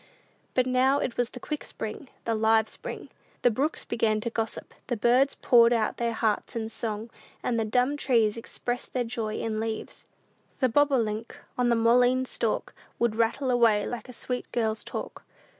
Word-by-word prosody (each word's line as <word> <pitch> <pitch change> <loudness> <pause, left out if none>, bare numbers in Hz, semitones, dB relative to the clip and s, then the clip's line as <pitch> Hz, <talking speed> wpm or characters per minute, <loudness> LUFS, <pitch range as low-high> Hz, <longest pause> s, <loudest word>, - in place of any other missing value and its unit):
But 255 - +3
now 260 +2 +3
it 255 -4 -2
was 245 -1 0
the 250 - -9
quick 300 +4 -4
spring, 220 +5 -7 0.2
the 230 - +1
live 220 0 +3
spring. - - -8 0.3
The 245 - +5
brooks 280 +8 -1
began 225 -2 +1
to 235 - -3
gossip; 225 -1 -4
the 245 - -1
birds 250 +5 +3
poured 235 -1 +6
out 225 -2 +1
their 235 -1 0
hearts 220 -1 -1
in 220 -1 -2
song, 225 0 -4 0.3
and 235 -2 0
the 225 - 0
dumb 250 +6 +1
trees 230 -7 +2
expressed 240 +1 -5
their 250 - +1
joy 225 -2 -3
in 220 -1 -2
leaves. 220 0 -4 0.5
"The 255 - +3
bobolink, 230 -5 +1 0.2
on 250 -1 +2
the 235 - +4
mullein 245 +3 +4
stalk, - - -2 0.2
Would 235 -2 +1
rattle 235 +4 +1
away 230 -4 +4
like 245 +1 -5
a - - -8
sweet 250 +1 -4
girl's 220 -2 0
talk." - - -6
235 Hz, 175 wpm, -27 LUFS, 220-250 Hz, 0.5 s, poured